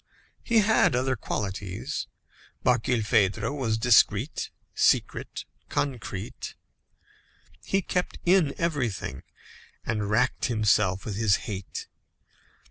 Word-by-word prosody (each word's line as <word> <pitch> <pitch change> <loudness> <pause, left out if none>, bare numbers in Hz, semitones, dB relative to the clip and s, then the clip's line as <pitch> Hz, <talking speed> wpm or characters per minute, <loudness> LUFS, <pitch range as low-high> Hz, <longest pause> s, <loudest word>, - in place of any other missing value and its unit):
He 230 -2 +4
had 210 - +4
other 130 +1 +1
qualities. 100 -3 -4 0.6
Barkilphedro 110 -2 +2
was 115 -6 0
discreet, 115 +2 +3 0.2
secret, - - +1 0.2
concrete. 110 -7 -4 1.1
He 195 -1 0
kept 180 +1 -2
in 175 -5 +4
everything 125 - -2 0.6
and 105 -3 -1
racked 125 +4 +1
himself 105 -4 +2
with 105 -3 -4
his 110 -3 +4
hate. 100 -4 -5
115 Hz, 90 wpm, -27 LUFS, 105-135 Hz, 1.1 s, He